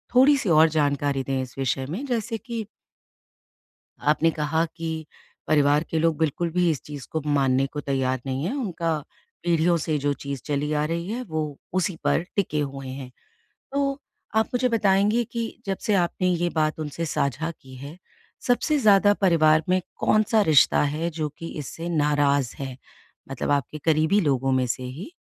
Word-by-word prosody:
थोड़ी-सी 265 -5 +5
और 160 0 +6
जानकारी 145 -3 0
दें 135 -1 -1
इस 130 0 -8
विषय 135 0 -1
में 215 - -4
जैसे 230 -3 -2
कि 230 0 -5 1.5
आपने 165 +2 +2
कहा 160 +1 0
कि 160 -1 -4 0.4
परिवार 145 +1 +3
के 160 - 0
लोग 165 -1 +2
बिल्कुल 160 +2 0
भी 175 0 +2
इस 150 - -1
चीज़ 145 -3 -8
को 160 - 0
मानने 135 -2 +2
को 145 +2 -6
तैयार 130 -2 -1
नहीं 135 +2 -2
हैं, 215 +11 -1
उनका 170 - -1 0.4
पीढ़ियों 170 0 +2
से 155 -1 -1
जो 145 +1 0
चीज़ 140 -2 -6
चली 150 0 -1
आ 150 0 +1
रही 170 +3 -3
है 245 +3 -3
वो 155 -3 -3 0.2
उसी 185 -2 0
पर - - +2
टिके 155 -7 0
हुए 135 -2 -5
हैं। 130 -1 -7 0.6
तो 275 0 0 0.4
आप 220 0 +3
मुझे 250 +1 +2
बताएँगे 210 +1 +2
कि 230 -1 -1 0.2
जब 195 -1 -1
से 210 - +3
आपने 180 0 +1
ये 175 0 +1
बात 155 0 0
उनसे 155 +2 -4
साझा 145 +3 -1
की 130 -1 -14
है 140 +6 -9 0.5
सबसे 290 +5 +2
ज़्यादा 205 -4 +5
परिवार 160 -4 +4
में 185 0 +3 0.2
कौन-सा 215 +1 +3
रिश्ता 155 -6 +5
है 165 +2 -1
जो 155 -1 -3
कि 165 - -6
इससे 165 +4 -6
नाराज़ 145 -4 +1
है। 135 -2 -5 0.5
मतलब 135 +1 -3
आपके 145 +1 0
करीबी 160 +5 +3
लोगों 135 -4 +1
में 130 -1 +2
से 130 +2 -3
ही 140 - -7
155 Hz, 175 wpm, -24 LUFS, 140-185 Hz, 1.5 s, और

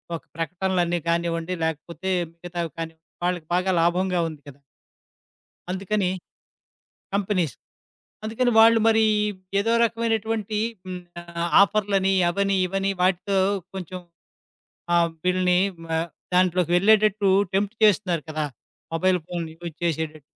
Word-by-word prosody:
ఒక 165 - -8
ప్రకటనలన్నీ 175 +1 0
గానివ్వండి, 170 +1 -1
లేకపోతే 170 +4 -4 0.2
మిగతావి 170 -1 -5
కానివ్ 165 -1 -6 0.3
వాళ్ళకి 175 -3 -2
బాగా 185 +1 +1
లాభంగా 180 +1 +1
ఉంది 150 -2 -11
కదా! 140 +1 -15 1.1
అందుకనీ 195 0 -1 1.1
కంపినీస్. 185 - 0 0.7
అందుకని 240 +3 0
వాళ్ళు 225 0 +7
మరీ 220 0 +4 0.6
ఏదో 225 +3 +1
రకమైనటువంటీ 225 -2 -1 0.3
హ్మ్, 180 -1 -5 0.2
ఆహ్, 170 0 -4
ఆఫర్లని, 195 -1 +2 0.2
అవని, 195 +1 +1
ఇవని, 195 +1 -1
వాటితో 190 +2 +1 0.4
కొంచం 185 -1 -6 1.0
ఆ - - +6 0.3
బిల్‌ని 180 -1 +3 0.4
ఆహ్, 165 +1 -1 0.3
దాంట్లోకి 180 -1 +2
వెళ్ళేటట్టూ 210 0 +4 0.2
టెంప్ట్ 205 +3 0
చేస్తున్నారు 185 -6 +2
కదా, 155 -1 -2 0.5
మొబైల్ 185 +2 +2
ఫోన్ 175 -1 -3 0.2
యూజ్ 170 -3 -6
జేసేటట్టు. 155 -2 -2
185 Hz, 110 wpm, -24 LUFS, 170-200 Hz, 1.1 s, వాళ్ళు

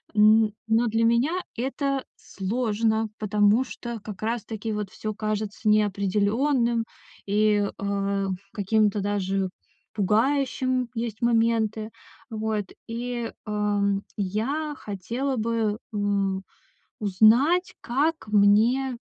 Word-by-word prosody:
н 215 0 +5
но 225 +2 +3
для 225 +1 +1
меня 235 +6 +3 0.2
это 270 +2 -1
сложно, 220 +1 -1
потому 210 +3 +3
что 235 -2 -7
как 205 -3 -8
раз-таки 225 -1 -3
вот 210 -2 -3
всё 215 0 -4
кажется 215 0 -3
неопределённым, 215 +5 +2 0.4
и, 205 0 +2
э, 200 0 -1 0.3
каким-то 210 0 +1
даже 195 -1 -1 0.4
пугающим, 255 +4 +1
есть 225 -2 -4
моменты. 225 -2 +1 0.4
Вот 215 -2 -2 0.2
и, 235 0 -4
эм, 205 -1 0
я 230 +11 -1
хотела 235 +7 -3
бы, 220 -2 0 0.2
м, 200 -2 0 0.6
узнать, 230 - +4
как 295 +4 0
мне, 220 +5 +3
220 Hz, 95 wpm, -25 LUFS, 205-235 Hz, 0.6 s, н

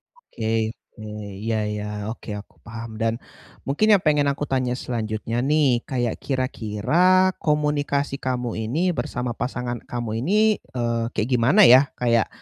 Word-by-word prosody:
Oke 110 - -2 0.2
oke, 110 - -11 0.4
iya 115 -1 0
iya. 105 0 -4 0.3
Oke, 115 - -10
aku 100 - -15
paham 115 0 -8
dan 115 0 +2 0.5
mungkin 215 +11 +3
yang 195 - +4
pengen 150 -2 +3
aku 140 - -4
tanya 130 -2 0
selanjutnya 115 -1 -3
nih, 135 -3 +2
kayak 120 -4 -1
kira-kira 140 - +2
komunikasi 145 -2 0
kamu 125 -2 -2 0.2
ini 175 +7 +1
bersama 125 -4 -3
pasangan 125 -1 -3
kamu 115 -2 -4
ini, 180 +10 0 0.4
eee, 115 -1 0
kayak 110 - -1
gimana 125 - +4
ya? 130 +3 +7
Kayak 115 -3 +2
125 Hz, 140 wpm, -23 LUFS, 115-145 Hz, 0.5 s, ya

